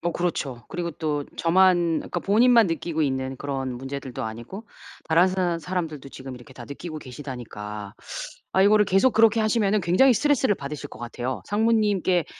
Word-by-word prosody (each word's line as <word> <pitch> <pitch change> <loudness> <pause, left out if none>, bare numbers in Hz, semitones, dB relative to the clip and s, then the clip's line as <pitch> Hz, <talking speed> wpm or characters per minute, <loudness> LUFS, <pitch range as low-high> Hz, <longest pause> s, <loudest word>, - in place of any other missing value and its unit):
뭐 175 0 -1
그렇죠. 145 -8 -3
그리고 170 -2 -4
또 150 -2 -2
저만 175 -1 +3
그러니까 175 - -4
본인만 230 +1 +5
느끼고 165 -1 -2
있는 130 -1 -1
그런 135 -2 -4
문제들도 135 0 -6
아니고 120 - -7 0.4
다른 165 +3 +5
사람 185 -2 0
사람들도 160 -6 -4
지금 130 -1 -8
이렇게 125 +2 -14
다 120 -2 -10
느끼고 155 +4 -7
계시다니까. 115 -7 -8 0.6
아 190 - +3
이거를 210 +1 +5
계속 195 +8 +3
그렇게 225 0 +5
하시면은 215 -2 +2
굉장히 185 +10 +4
스트레스를 270 -3 +2
받으실 145 -2 -6
것 - - -12
같아요. 120 +2 -4
상무님께 205 -5 +2
165 Hz, 410 characters per minute, -24 LUFS, 135-195 Hz, 0.6 s, 본인만